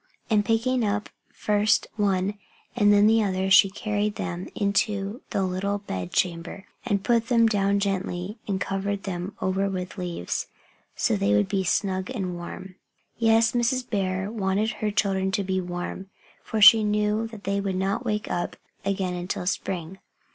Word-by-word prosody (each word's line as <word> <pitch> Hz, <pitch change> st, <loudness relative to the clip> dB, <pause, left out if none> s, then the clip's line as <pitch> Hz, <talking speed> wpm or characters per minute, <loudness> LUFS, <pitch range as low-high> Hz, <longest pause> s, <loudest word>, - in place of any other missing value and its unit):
And 210 Hz, -1 st, +4 dB
picking 230 Hz, +3 st, +1 dB
up 210 Hz, 0 st, -1 dB, 0.2 s
first 210 Hz, 0 st, +2 dB
one 200 Hz, -2 st, +1 dB, 0.4 s
and 205 Hz, -4 st, +4 dB
then 205 Hz, 0 st, +6 dB
the 225 Hz, +1 st, +5 dB
other 190 Hz, -1 st, -1 dB
she 190 Hz, +1 st, +7 dB
carried 205 Hz, +1 st, -2 dB
them 175 Hz, +1 st, -4 dB
into 200 Hz, +2 st, 0 dB
their 195 Hz, -, 0 dB
little 190 Hz, +2 st, -1 dB
bed 95 Hz, -, -5 dB
chamber 175 Hz, +2 st, -2 dB, 0.2 s
and 200 Hz, -1 st, -1 dB
put 230 Hz, -2 st, +2 dB
them 235 Hz, -2 st, +4 dB
down 200 Hz, -2 st, +2 dB
gently 195 Hz, +1 st, -2 dB
and 195 Hz, -2 st, -1 dB
covered 200 Hz, 0 st, -2 dB
them 185 Hz, +1 st, -4 dB
over 190 Hz, +1 st, +1 dB
with 185 Hz, 0 st, -5 dB
leaves, 175 Hz, -, -3 dB, 0.5 s
so -, -, +1 dB
they 100 Hz, +1 st, +2 dB
would 105 Hz, -1 st, +3 dB
be 195 Hz, -1 st, 0 dB
snug 190 Hz, +1 st, 0 dB
and 195 Hz, -8 st, -3 dB
warm. 185 Hz, +2 st, -8 dB, 0.4 s
Yes, 225 Hz, 0 st, +4 dB
Mrs. 245 Hz, +1 st, 0 dB
Bear 190 Hz, -1 st, -1 dB
wanted 205 Hz, 0 st, 0 dB
her 215 Hz, -2 st, -2 dB
children 195 Hz, -2 st, 0 dB
to 200 Hz, -1 st, +1 dB
be 190 Hz, 0 st, -1 dB
warm, 180 Hz, +2 st, -5 dB, 0.3 s
for 220 Hz, -, -2 dB
she 215 Hz, +2 st, +9 dB
knew 210 Hz, +1 st, +1 dB
that 220 Hz, -3 st, -11 dB
they 200 Hz, +1 st, 0 dB
would 195 Hz, -1 st, -2 dB
not 195 Hz, +5 st, -1 dB
wake 210 Hz, -3 st, -2 dB
up 175 Hz, -, -2 dB, 0.3 s
again 190 Hz, -2 st, -1 dB
until 180 Hz, 0 st, -4 dB
spring. 180 Hz, 0 st, -3 dB
200 Hz, 165 wpm, -25 LUFS, 185-210 Hz, 0.5 s, she